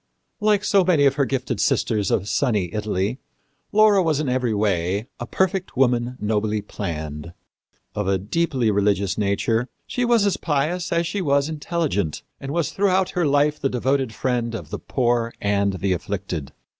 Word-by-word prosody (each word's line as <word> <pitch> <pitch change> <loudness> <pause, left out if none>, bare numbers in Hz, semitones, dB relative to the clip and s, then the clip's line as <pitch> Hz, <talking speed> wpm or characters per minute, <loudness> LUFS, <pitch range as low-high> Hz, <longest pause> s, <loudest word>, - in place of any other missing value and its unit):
" - - -51
Like 205 -1 +3
so 200 -2 +4
many 170 -6 +3
of 135 - +4
her 140 0 +1
gifted 130 -4 -2
sisters 105 -1 +1
of 100 - 0
sunny 105 -9 0
Italy, 105 +3 -1 0.5
Laura 210 -2 +5
was 160 -4 +1
in 155 - -1
every 125 -2 0
way 100 -1 0
"a 120 - -5
perfect 190 -2 -1
woman 125 -1 +2
nobly 105 0 0
planned." 80 -3 -5 0.6
Of 105 -2 -2
a 95 0 +2
deeply 125 - 0
religious 100 -1 +1
nature, 110 +4 0 0.2
she 245 - -2
was 235 -3 +3
as 200 - +1
pious 165 +4 -1
as 170 0 +1
she 200 +4 -2
was 140 -2 +2
intelligent, 150 - -2 0.2
and 135 - -6
was 170 -1 0
throughout 190 -1 +1
her 175 -3 +1
life 145 +1 +2
the 135 - 0
devoted 130 0 0
friend 120 0 -1
of - - -8
the - - -4
poor 120 -2 0
and 100 -1 +1
the 95 0 0
afflicted. 90 -5 -4
125 Hz, 170 wpm, -23 LUFS, 100-155 Hz, 0.6 s, Laura